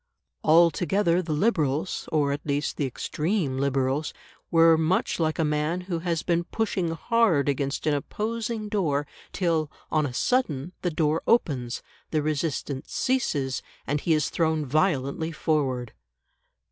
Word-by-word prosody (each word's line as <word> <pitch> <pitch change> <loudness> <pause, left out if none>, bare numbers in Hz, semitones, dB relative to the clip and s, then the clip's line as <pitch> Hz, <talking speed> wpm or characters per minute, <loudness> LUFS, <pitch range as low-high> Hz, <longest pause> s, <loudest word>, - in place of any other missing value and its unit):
Altogether 170 +3 +4
the 165 -3 -5
Liberals, 155 - 0
or 145 -3 +2
at 145 +1 -3
least 145 0 -1
the 140 - -1
extreme 150 - -1
Liberals, 135 +2 0 0.3
were 165 0 +6
much 160 +4 +1
like 160 -1 +1
a 165 - +2
man 150 +4 0
who 180 -2 -3
has 165 -1 -1
been 170 -1 +1
pushing 195 -6 -1
hard 170 - +2
against 140 0 -1
an 155 - +3
opposing 220 - -3
door, 160 -9 0 0.3
till, 165 -5 0 0.2
on 155 -1 +2
a - - -5
sudden, 170 - 0
the 180 - 0
door 155 -1 +1
opens, 130 - +1 0.3
the 155 -2 0
resistance 150 -2 -2
ceases, 145 - 0 0.2
and 145 0 -1
he 165 - +2
is 150 -2 0
thrown 160 -2 +1
violently 155 +1 0
forward. 135 -7 -1
155 Hz, 140 wpm, -26 LUFS, 145-175 Hz, 0.3 s, were